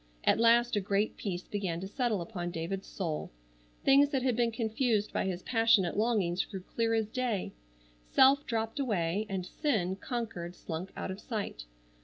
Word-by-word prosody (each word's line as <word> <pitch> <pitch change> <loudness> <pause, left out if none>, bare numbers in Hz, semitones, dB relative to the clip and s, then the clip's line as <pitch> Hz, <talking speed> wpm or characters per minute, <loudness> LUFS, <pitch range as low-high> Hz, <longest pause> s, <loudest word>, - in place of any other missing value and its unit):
At - - +3
last 235 +1 +5
a - - +3
great 200 +2 0
peace 180 -3 -4
began 190 -5 -2
to 190 - -4
settle 220 -2 0
upon 175 -2 -4
David's 175 +3 -4
soul. 165 -6 -3 0.5
Things 275 +1 +6
that 270 -3 0
had 255 -3 +2
been 235 0 +2
confused 225 -1 0
by - - 0
his 185 -1 -3
passionate 225 -6 +3
longings 205 -5 +1
grew 190 - -7
clear 225 +4 0
as 220 -2 +1
day. 235 -4 -2 0.5
Self 275 - +5
dropped 225 +3 -2
away, 205 -5 0
and 190 -2 -2
sin, 195 - 0
conquered, 195 -6 -4
slunk 175 +2 -6
out - - -3
of 190 - -6
sight. 205 - -4
210 Hz, 170 wpm, -31 LUFS, 185-235 Hz, 0.5 s, Things